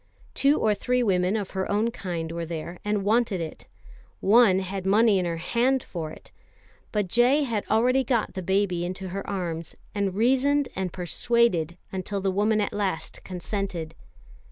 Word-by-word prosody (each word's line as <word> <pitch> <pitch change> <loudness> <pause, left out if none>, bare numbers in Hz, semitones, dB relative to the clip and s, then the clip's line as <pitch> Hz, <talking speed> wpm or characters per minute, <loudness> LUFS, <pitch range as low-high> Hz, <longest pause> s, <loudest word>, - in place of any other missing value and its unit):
Two 280 +2 +3
or 215 - +3
three 250 +4 0
women 185 -2 +2
of 205 -3 -3
her 190 -1 -2
own 215 +3 +1
kind 170 -7 -4
were 170 0 -4
there 165 +1 -6
and 210 -1 0
wanted 215 -2 +2
it. 160 -2 -7 0.5
One 210 -2 +5
had 190 0 -3
money 205 +1 +4
in 180 - -1
her 170 -1 -2
hand 245 +9 +1
for 165 -3 -5
it. - - -13 0.6
But 210 -3 0
J. 245 +9 +4
had 230 -6 -2
already 250 +4 +3
got 235 -3 0
the 190 - -4
baby 190 -1 +1
into 185 +1 -4
her 195 +2 -5
arms, 170 -5 -4 0.2
and 200 -3 -1
reasoned 270 +5 +2
and 185 -2 -2
persuaded 180 -2 +1
until 195 +1 -3
the 195 0 0
woman 210 +3 +2
at 205 - -2
last 200 -2 -3
consented. 180 -3 -4
195 Hz, 170 wpm, -26 LUFS, 180-230 Hz, 0.6 s, One